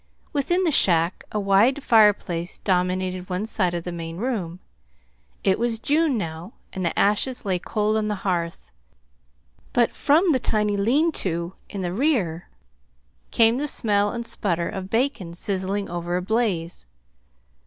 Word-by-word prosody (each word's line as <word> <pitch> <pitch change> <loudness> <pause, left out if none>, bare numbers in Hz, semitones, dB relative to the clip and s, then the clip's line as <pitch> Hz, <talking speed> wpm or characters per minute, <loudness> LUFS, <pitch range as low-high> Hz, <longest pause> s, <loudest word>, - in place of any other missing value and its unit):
Within 350 +6 +1
the 335 - +2
shack 170 - +3
a 210 - -1
wide 210 +8 +3
fireplace 205 -7 +3
dominated 185 0 -1
one 185 +3 -2
side 185 -6 0
of 170 - -3
the 175 - -5
main 165 -1 -6
room. 190 -7 -3 0.8
It 190 +1 +2
was 235 -1 0
June 295 +3 +1
now, 165 +1 -6 0.2
and 190 - -4
the 170 - -1
ashes 210 +5 +1
lay 185 -3 0
cold 210 +3 -1
on 215 -1 -1
the 210 - -1
hearth; 170 - -2 1.0
but 240 -1 +3
from 325 +5 +3
the 260 - +2
tiny 210 -3 +1
lean 265 +12 +2
to 170 -1 -3 0.2
in 200 - -5
the 175 0 -2
rear 205 - 0 0.8
came 230 +2 +4
the 295 - -1
smell 205 -6 +1
and 235 0 -4
the - - -7
sputter 170 -4 -1
of 190 0 -6
bacon 225 -8 -1
sizzling 195 +2 -2
over 175 +1 -3
a - - -2
blaze. 185 - -1
200 Hz, 155 wpm, -23 LUFS, 175-235 Hz, 1.0 s, came